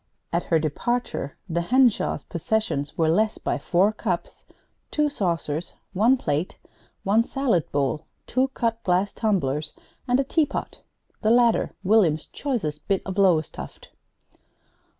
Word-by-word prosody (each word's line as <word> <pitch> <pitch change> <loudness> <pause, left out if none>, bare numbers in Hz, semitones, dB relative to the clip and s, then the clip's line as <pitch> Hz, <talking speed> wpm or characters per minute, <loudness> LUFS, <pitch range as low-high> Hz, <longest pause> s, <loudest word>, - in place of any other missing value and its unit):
At 170 - 0
her 165 - +3
departure 155 - -2
the 170 -1 -1
Henshaws' 245 +4 +2
possessions 170 -5 -2
were 160 - +3
less 215 +7 +2
by - - -2
four 190 +4 +3
cups, - - -4 0.4
two 300 -1 +1
saucers, 170 - -2 0.2
one 230 +8 +4
plate, 155 - -2 0.5
one 210 +4 +3
salad 245 - 0
bowl, 145 +2 -1 0.2
two 260 +2 +1
cut 230 -1 -1
glass 185 +2 +1
tumblers, 150 - -1 0.3
and 250 +1 +3
a - - +3
teapot 290 +1 -1 0.4
the 215 - +2
latter 235 0 +3
William's 185 -7 +3
choicest 175 - -3
bit 195 -2 +1
of 195 +1 -3
Lowestoft. 175 -6 0
195 Hz, 130 wpm, -24 LUFS, 160-235 Hz, 0.5 s, one